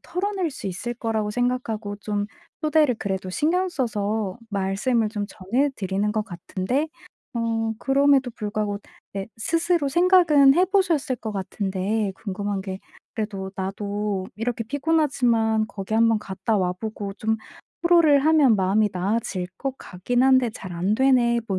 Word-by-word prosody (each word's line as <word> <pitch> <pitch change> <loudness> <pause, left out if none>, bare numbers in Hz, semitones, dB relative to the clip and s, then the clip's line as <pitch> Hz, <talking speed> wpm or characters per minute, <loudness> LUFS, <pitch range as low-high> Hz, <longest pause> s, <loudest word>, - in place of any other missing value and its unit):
털어낼 380 -2 -2
수 260 - -7
있을 195 +6 -4
거라고 220 -3 -1
생각하고 225 -3 -2
좀 205 0 -2 0.4
초대를 305 -4 +3
그래도 190 -2 -3
신경 355 - +1
써서 215 - -2
말씀을 205 +4 0
좀 205 -2 -3
전해드리는 210 -2 -1
것 215 - 0
같은데 190 - -2 0.5
어 225 -1 0
그럼에도 275 -1 +3
불구하고 210 -2 -3 0.4
네 195 -1 -3
스스로 330 +3 +1
생각은 320 -4 +5
해 365 +4 +4
보셨을 345 -9 +1
것 220 -2 -5
같은데 195 +1 -2
궁금한 200 0 -3
게 190 -1 -5 0.4
그래도 200 -3 -4
'나도 200 0 -3
이렇게 230 +1 -2
피곤하지만 245 -6 +1
거기 205 0 -5
1 230 +1 +5
번 225 -1 +3
갔다 200 +2 -2
와 180 -1 +1
보고 205 -1 -5
좀 220 +2 0 0.5
토로를 335 -4 +6
하면 305 -7 +5
마음이 200 +2 +2
나아질 190 -1 -1
것 270 -1 -3
같긴 240 +7 -1
한데 260 -2 +4
잘 190 -5 -8
안 180 +5 0
되네.' 245 -2 +3
뭐 190 -2 0
220 Hz, 300 characters per minute, -24 LUFS, 200-270 Hz, 0.5 s, 토로를